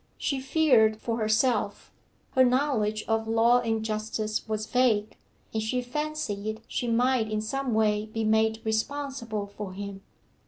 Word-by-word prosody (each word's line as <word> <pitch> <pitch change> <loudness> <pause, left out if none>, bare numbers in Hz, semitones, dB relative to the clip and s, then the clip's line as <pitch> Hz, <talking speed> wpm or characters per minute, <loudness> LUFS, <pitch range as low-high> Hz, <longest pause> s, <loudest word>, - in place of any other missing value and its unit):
She 275 -2 -1
feared 260 -7 +4
for 230 0 -2
herself; 215 -1 +1 0.4
her 260 - +5
knowledge 245 -5 +1
of 225 0 0
law 230 +2 +4
and 225 -2 -1
justice 215 0 -2
was 215 0 -1
vague, 220 -4 +1 0.4
and 220 - 0
she 250 +3 -1
fancied 245 -6 -3
she 245 - -2
might 240 -1 +2
in 215 0 -1
some 250 +2 -2
way 210 -1 +2
be 225 +1 -3
made 220 +1 +2
responsible 230 -1 -2
for 200 -1 -7
him. 200 0 -7
220 Hz, 145 wpm, -27 LUFS, 215-250 Hz, 0.4 s, her